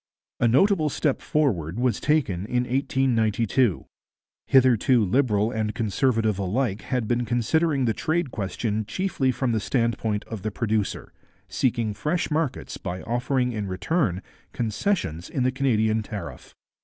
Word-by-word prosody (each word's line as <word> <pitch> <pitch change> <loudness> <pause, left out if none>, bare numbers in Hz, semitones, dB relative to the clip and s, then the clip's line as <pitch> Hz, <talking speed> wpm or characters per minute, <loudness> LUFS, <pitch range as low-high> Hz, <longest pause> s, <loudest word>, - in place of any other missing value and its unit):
A 120 - +3
notable 155 - +3
step 140 0 0
forward 100 - 0
was 125 -4 +1
taken 110 - 0
in 125 +1 +1
1892. 120 -4 +1 0.6
Hitherto 130 -3 +4
Liberal 110 0 +2
and 110 -2 -2
Conservative 115 -2 +1
alike 105 +2 -1
had 125 0 -2
been 120 +1 +1
considering 135 +5 +1
the 115 - +2
trade 160 0 -1
question 105 +1 -2
chiefly 140 - 0
from 130 -1 -1
the 110 - +1
standpoint 115 -2 -1
of 110 -4 -7
the 110 - -2
producer, 110 -1 -2 0.3
seeking 110 +2 0
fresh 150 +12 -2
markets 150 -3 -2
by 90 -1 -5
offering 125 +1 0
in 105 -3 -3
return 95 - -1 0.3
concessions 110 - -2
in 130 - -1
the 130 - +2
Canadian 110 -5 +1
tariff. 105 -4 -8
120 Hz, 135 wpm, -25 LUFS, 105-135 Hz, 0.6 s, Hitherto